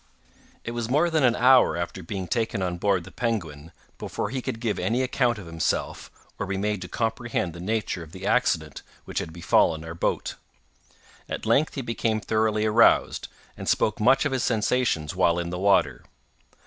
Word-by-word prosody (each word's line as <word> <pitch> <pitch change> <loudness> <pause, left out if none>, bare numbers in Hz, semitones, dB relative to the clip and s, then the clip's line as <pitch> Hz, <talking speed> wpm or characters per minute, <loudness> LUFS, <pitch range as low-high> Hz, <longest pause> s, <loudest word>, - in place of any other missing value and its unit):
It 115 - -4
was 120 -1 -3
more 155 +6 +2
than 160 -3 +2
an 120 -2 +4
hour 125 -6 +5
after 85 +2 -4
being 95 +2 -5
taken 110 -3 -1
on 90 -1 -3
board 95 -2 +1
the 95 - -12
Penguin 85 -10 -3 0.3
before 105 - -4
he 130 -1 -2
could 120 -2 -4
give 115 -3 -2
any 125 +3 0
account 125 -2 +1
of 100 - -9
himself, 80 -1 -2 0.3
or 100 - -2
be 100 0 -2
made 105 0 -1
to 90 - -6
comprehend 115 -3 -2
the 85 - -10
nature 105 -1 -2
of 80 -2 -11
the 95 +1 -8
accident - - +1 0.2
which - - -3
had 80 - -5
befallen 80 -1 +2
our 80 - -6
boat. 85 - -2 0.9
At - - -4
length 135 +8 +2
he 135 - -3
became 115 -2 -1
thoroughly 110 0 0
aroused, 110 +2 +3 0.3
and - - -5
spoke 110 - +1
much 130 +6 +4
of 145 - 0
his 130 -2 -1
sensations 110 -8 0
while 85 -2 +3
in 85 0 -3
the 90 - -4
water. 90 -10 +2
105 Hz, 185 wpm, -25 LUFS, 85-120 Hz, 0.9 s, hour